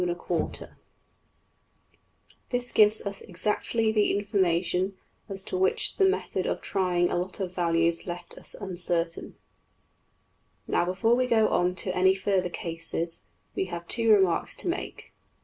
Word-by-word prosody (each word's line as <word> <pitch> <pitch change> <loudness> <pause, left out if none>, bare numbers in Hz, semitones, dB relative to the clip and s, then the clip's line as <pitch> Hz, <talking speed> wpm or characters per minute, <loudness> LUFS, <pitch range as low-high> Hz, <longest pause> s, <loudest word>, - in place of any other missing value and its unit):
\end{DPalign*} 175 -1 -3 1.8
This 245 0 0
gives 215 0 +6
us 200 0 -5
exactly 215 +4 +1
the 210 -2 +2
information 185 -2 0 0.3
as 195 -1 -5
to - - -5
which 185 0 +1
the 385 -2 +5
method 395 - -2
of - - -1
trying 180 -3 0
a - - 0
lot 180 +3 -3
of 185 -2 -3
values 170 -1 +1
left 175 0 -6
us - - -12
uncertain. 175 -4 -1 1.3
\DPPageSep{109.png}% - - -16
Now, - - +2
before 195 +6 +1
we 255 +1 +2
go 220 -3 +3
on 180 +1 +1
to 185 +1 -2
any 190 +1 +4
further 190 -2 0
cases, 165 0 -2 0.3
we - - -1
have 170 -2 -7
two 230 -1 0
remarks 190 -5 +3
to - - -8
make. - - -5
185 Hz, 145 wpm, -27 LUFS, 175-205 Hz, 1.8 s, gives